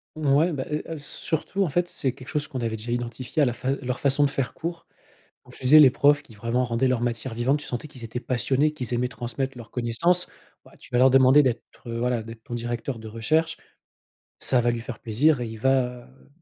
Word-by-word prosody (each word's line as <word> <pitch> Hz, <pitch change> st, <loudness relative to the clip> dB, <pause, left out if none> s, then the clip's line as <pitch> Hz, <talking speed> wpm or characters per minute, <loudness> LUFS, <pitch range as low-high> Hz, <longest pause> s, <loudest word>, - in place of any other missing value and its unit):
Ouais, 155 Hz, +2 st, +2 dB
bah, 130 Hz, -, -2 dB
elle 150 Hz, 0 st, -2 dB
elle 160 Hz, -2 st, -6 dB
surtout, 160 Hz, +6 st, -2 dB
en -, -, -2 dB
fait, 175 Hz, +4 st, +1 dB
c'est 135 Hz, -, -2 dB
quelque 130 Hz, -1 st, -13 dB
chose 150 Hz, -1 st, -2 dB
qu'on 135 Hz, -4 st, -5 dB
avait 115 Hz, -2 st, -2 dB
déjà 110 Hz, +2 st, -6 dB
identifié 120 Hz, +5 st, -2 dB
à -, -, +6 dB
la 120 Hz, -, 0 dB
fa 130 Hz, +2 st, -2 dB
leur 125 Hz, 0 st, -3 dB
façon 140 Hz, +1 st, +2 dB
de 145 Hz, -, +3 dB
faire 135 Hz, -2 st, -2 dB
cours, 170 Hz, +1 st, -5 dB, 0.6 s
donc -, -, -16 dB
je -, -, -12 dB
te -, -, -10 dB
disais, 150 Hz, +4 st, +8 dB
les 145 Hz, -, +9 dB
profs 145 Hz, +3 st, +3 dB
qui 120 Hz, -, -17 dB
vraiment 115 Hz, +4 st, 0 dB
rendaient 120 Hz, +2 st, +1 dB
leurs 125 Hz, -2 st, +1 dB
matières 120 Hz, +1 st, -2 dB
vivantes, 130 Hz, +6 st, +1 dB
tu -, -, -9 dB
sentais 130 Hz, +3 st, -5 dB
qu'ils 130 Hz, -5 st, -11 dB
étaient 115 Hz, +2 st, -5 dB
passionnés, 130 Hz, +5 st, +1 dB
qu'ils 125 Hz, -4 st, -3 dB
aimaient 125 Hz, +1 st, +1 dB
transmettre 125 Hz, +2 st, -4 dB
leurs 115 Hz, -2 st, -10 dB
connaissances, 130 Hz, +11 st, 0 dB, 0.4 s
bah, -, -, -17 dB
tu -, -, -16 dB
vas 120 Hz, -, +2 dB
leur 130 Hz, +1 st, +7 dB
demander 135 Hz, +2 st, +6 dB
d'être, 120 Hz, -3 st, 0 dB, 0.3 s
heu, 115 Hz, 0 st, -3 dB
voilà, 120 Hz, -1 st, 0 dB
d'être 115 Hz, 0 st, -11 dB
ton -, -, -11 dB
directeur 120 Hz, +1 st, -3 dB
de 110 Hz, -, -9 dB
recherche, 155 Hz, +9 st, 0 dB, 0.8 s
ça 125 Hz, -, +3 dB
va 120 Hz, 0 st, +2 dB
lui 120 Hz, -, -2 dB
faire 120 Hz, -2 st, -7 dB
plaisir 130 Hz, +5 st, +2 dB
et 120 Hz, -, -2 dB
il 110 Hz, -, -8 dB
va, 125 Hz, 0 st, +1 dB
heu, 130 Hz, +1 st, -22 dB
130 Hz, 240 wpm, -25 LUFS, 120-145 Hz, 0.8 s, les